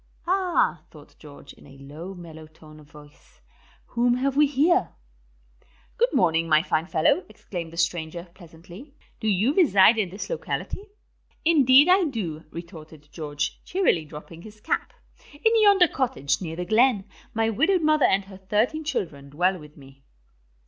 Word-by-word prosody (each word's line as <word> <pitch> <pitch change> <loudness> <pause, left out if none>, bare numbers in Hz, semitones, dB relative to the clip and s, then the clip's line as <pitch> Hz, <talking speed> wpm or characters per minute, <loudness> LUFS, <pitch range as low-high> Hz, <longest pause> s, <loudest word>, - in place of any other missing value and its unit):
"Ah," 355 - +1
thought 150 -2 -17
George, 145 -2 -13
in - - -18
a 135 0 -15
low, 155 +8 -10
mellow 160 -3 -11
tone 155 -1 -17
of 150 -1 -18
voice, 150 0 -18 0.5
"whom 240 0 +1
have 270 +2 -1
we 295 +1 +4
here?" 310 +7 +1 1.0
"Good 485 +1 +2
morning, 165 -1 +1
my 155 0 +4
fine 165 -2 -1
fellow," 180 - +2
exclaimed 175 -6 -8
the 165 - -12
stranger, 170 0 -2
pleasantly. 180 - -14 0.2
"Do 220 - -3
you 215 +7 +2
reside 225 - +5
in 195 -4 -1
this 195 +4 -7
locality?" 435 -4 -5 0.6
"Indeed 285 -3 +6
I 370 0 +4
do," 180 - -5
retorted 160 -3 -11
George, 145 -3 -5
cheerily 330 - 0
dropping 155 +2 -11
his 215 +2 -14
cap. - - -2 0.4
"In 445 +10 +2
yonder 400 -4 +6
cottage, 140 - -1
near 165 -3 -5
the 180 +1 -4
glen, 220 0 +2 0.3
my 225 0 +1
widowed 330 - +1
mother 305 -1 +3
and 195 0 +2
her 190 -1 -12
thirteen 215 +11 -1
children 165 - -4
dwell 180 +6 0
with 150 -1 -15
me." 135 -1 -17
185 Hz, 155 wpm, -24 LUFS, -, 1.0 s, Indeed